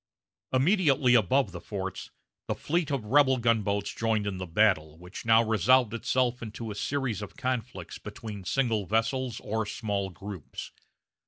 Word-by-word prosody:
Immediately 140 -3 +3
above 120 0 +3
the 85 -1 -8
forts, 95 -3 -5 0.4
the - - -1
fleet 165 0 -1
of 135 -6 -2
rebel 130 +3 +4
gunboats 105 -4 +1
joined 110 -2 0
in 100 -2 -2
the 90 0 -5
battle, 80 -4 +2
which 90 +6 -10
now 115 +1 +6
resolved 115 +2 +3
itself 125 +1 0
into 110 0 -6
a - - -4
series 135 -2 -2
of 105 - -8
conflicts 120 -8 -4
between 105 -1 -8
single 110 -2 0
vessels 115 +3 0
or 110 +1 -1
small 105 -2 -2
groups. 95 -2 -8
110 Hz, 150 wpm, -28 LUFS, 100-130 Hz, 0.4 s, now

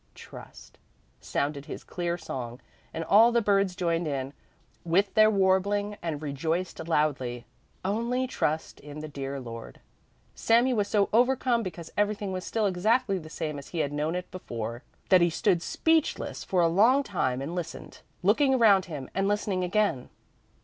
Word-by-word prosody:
Trust!" - - -13 0.4
sounded 145 0 -2
his - - -8
clear 175 -1 -3
song, 125 -6 -6 0.3
and 165 - -4
all 220 +7 +6
the 235 - +3
birds 200 -4 +2
joined 170 -3 0
in 135 -1 -3 0.5
with 185 +4 +1
their 215 -1 +6
warbling 200 +1 +1
and 155 -3 -4
rejoiced 160 +4 -3
loudly: 135 -7 0 0.4
"Only 235 +6 0
trust 160 -10 -2
the 150 +1 -7
dear 140 -1 -5
Lord!" 115 - -9 0.5
Sami 240 +3 +3
was 205 -3 0
so 205 -1 +2
overcome 245 0 +3
because 175 -5 -7
everything 205 -1 0
was 185 -1 -4
still 220 0 -1
exactly 200 +2 +1
the 155 -2 -11
same 155 -2 -4
as 140 - -11
he 175 - -7
had 145 -2 -1
known 150 +3 -1
it 180 0 -5
before, 120 -9 -6 0.3
that 185 -2 +6
he 175 - +4
stood 175 +1 +1
speechless 320 - 0
for 185 -2 +1
a 170 - +4
long 225 +11 +4
time 130 - -1
and 140 +5 -5
listened, 175 -2 -6 0.2
looking 265 +8 +4
around 205 -6 +5
him 145 -7 -7
and 195 0 0
listening 205 -2 0
again. 190 - 0
180 Hz, 160 wpm, -27 LUFS, 150-210 Hz, 0.5 s, all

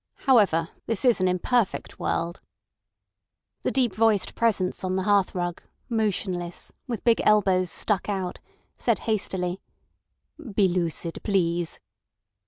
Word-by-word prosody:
However, 200 - +4 0.2
this 225 +1 -1
is 240 -6 +4
an 185 - +3
imperfect 190 +5 0
world—" 170 +2 -2 1.2
The - - 0
deep 250 -6 +2
voiced 215 -3 +2
Presence 200 -5 0
on 185 0 -1
the 190 - 0
hearthrug, 185 -3 +1 0.3
motionless, 190 -6 -2 0.2
with 235 -4 -4
big 235 -1 +4
elbows 190 -4 +3
stuck 205 +3 -1
out, 190 -3 -3 0.4
said - - +2
hastily: 190 -4 -1 0.9
"Be 200 -2 +5
lucid, 170 -2 -2
please." 175 -4 0
190 Hz, 115 wpm, -25 LUFS, 180-215 Hz, 1.2 s, Be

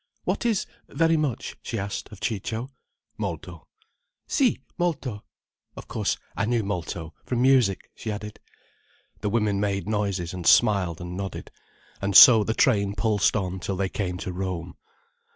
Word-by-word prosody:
What 240 - -1
is 220 -4 +1 0.2
very 165 0 +2
much?" 150 -7 -2
she 115 - -4
asked 100 0 -4
of 105 - -11
Ciccio. 115 +4 -3 0.5
"Molto." - - -5 0.6
"Si, 260 -5 +2 0.2
molto. 145 - -2 0.5
Of - - -9
course, - - -1 0.2
I - - 0
knew 115 0 +1
molto, 85 -4 -4
from, 125 -1 -1
music," 130 -8 +3
she 110 - -5
added. 105 0 -7 0.8
The 105 - -1
women 105 -2 +1
made 100 -1 -1
noises, 100 -5 -1
and 90 -3 -4
smiled 95 -6 +4
and 90 0 -6
nodded, 95 0 -6 0.5
and 100 -1 -1
so 115 -4 +10
the 110 +2 -2
train 100 -5 +2
pulsed 105 0 +2
on 95 -2 -2
till 95 +2 -3
they 95 0 -1
came 90 -3 -3
to 95 -1 -5
Rome. 90 -2 -4
105 Hz, 150 wpm, -25 LUFS, 95-115 Hz, 0.8 s, so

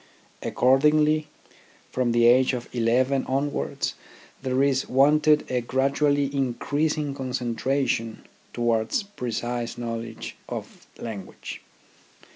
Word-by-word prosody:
Accord 130 +2 +3
ingly, 155 +1 +3 0.7
from 125 -2 +1
the 120 0 +4
age 130 +2 +5
of 120 -1 -4
eleven 125 +3 +2
onwards 135 - -1 0.5
there 130 0 +1
is 135 -1 +1
wanted 150 +3 +4
a 125 -1 +1
gradually 140 +3 +1
increasing 145 +3 0
concentration 125 -2 -1 0.3
to - - -5
wards 115 - +1
precise 120 - -4
knowledge 115 -1 -5
of - - -7
language. 110 -4 -7
130 Hz, 100 wpm, -25 LUFS, 120-140 Hz, 0.7 s, age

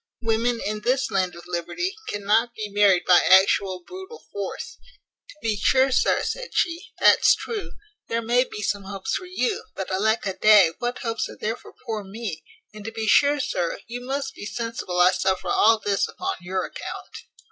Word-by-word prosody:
Women 230 +1 +1
in 210 +1 -3
this 260 +4 0
land 185 -2 0
of 170 - -12
liberty, 180 - -3
cannot 215 +4 +1
be 215 -1 -5
married 200 -3 +4
by 180 -1 +7
actual 190 -1 +4
brutal 380 +5 -10
force." 200 -1 -6 0.5
"To - - -13
be 220 -2 +1
sure, 260 +6 +3
sir," - - +2
said - - -5
she, 335 0 0
"that's - - +6
true. 435 -4 -6 0.3
There 230 0 -2
may 245 +3 +3
be 210 - -7
some 200 0 -2
hopes 195 -1 -4
for 365 - -3
you; 305 -9 -2
but 190 - -5
alack 220 +4 +1
a 195 - -1
day! 200 -5 +6
what 245 +1 -2
hopes 230 -1 -2
are - - -11
there 220 +2 -2
for - - -16
poor 220 -3 -3
me? 200 -3 -6 0.3
And 215 -1 -10
to 225 - -4
be 225 -1 -4
sure, 285 +7 +4
sir, 175 -10 -2
you 240 +1 -6
must 270 +1 -3
be 205 - -8
sensible 230 -7 -4
I 180 +1 +6
suffer 190 0 -1
all 225 +1 +5
this 205 -2 0
upon 380 +1 -4
your 185 +1 -2
account. - - -8
220 Hz, 190 wpm, -24 LUFS, 195-245 Hz, 0.5 s, by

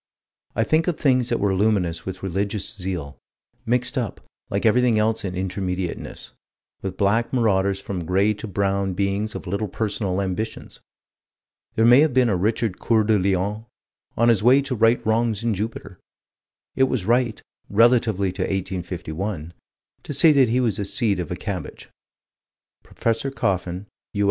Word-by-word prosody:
I - - +2
think 160 +2 +1
of 175 - 0
things 130 -3 +2
that 120 - 0
were 100 -1 +1
luminous 95 -5 0
with 95 0 -6
religious 100 +2 -2
zeal, 90 -7 -5 0.5
mixed 125 +3 +1
up, 115 -5 -4 0.3
like 100 +3 -1
everything 120 0 +4
else 110 +1 +1
in 95 -2 -4
Intermediateness, 95 -1 -4 0.5
with 95 -1 -5
black 110 +4 +1
marauders 100 -6 +2
and - - -23
from 90 -4 -4
gray 95 +5 +2
to 105 +2 -8
brown 100 -1 0
beings 100 +3 -1
of - - -6
little 100 +4 -2
personal 100 -2 -2
ambitions. 100 +3 -4 1.0
There 110 - +3
may 120 +3 +8
have 150 -4 +3
been 125 -2 +4
a 100 - +2
Richard 105 +2 -1
Coeur 110 -2 +2
de 105 -1 +3
Lion, 100 +4 -1 0.5
on 115 +1 +4
his 115 -5 +3
way 130 +5 +5
to 140 -1 -3
right 115 +1 +3
wrongs 110 -1 +1
in 115 -1 +1
Jupiter. 100 -2 -5 0.8
It 130 - +4
was 130 -7 -2
right, 120 0 +1 0.3
relatively 110 -3 +3
to 95 +1 -6
1851, 90 -2 -4 0.5
to - - -6
say 155 +4 +6
that 135 -5 +4
he 125 +3 +2
was 115 -5 0
a 100 - -1
seed 100 -2 0
of 85 - -4
a - - -3
cabbage. - - -6 0.9
Prof. 115 +4 -2
Coffin, 90 -2 -1 0.3
U. - - -2
105 Hz, 165 wpm, -23 LUFS, 95-115 Hz, 1.0 s, may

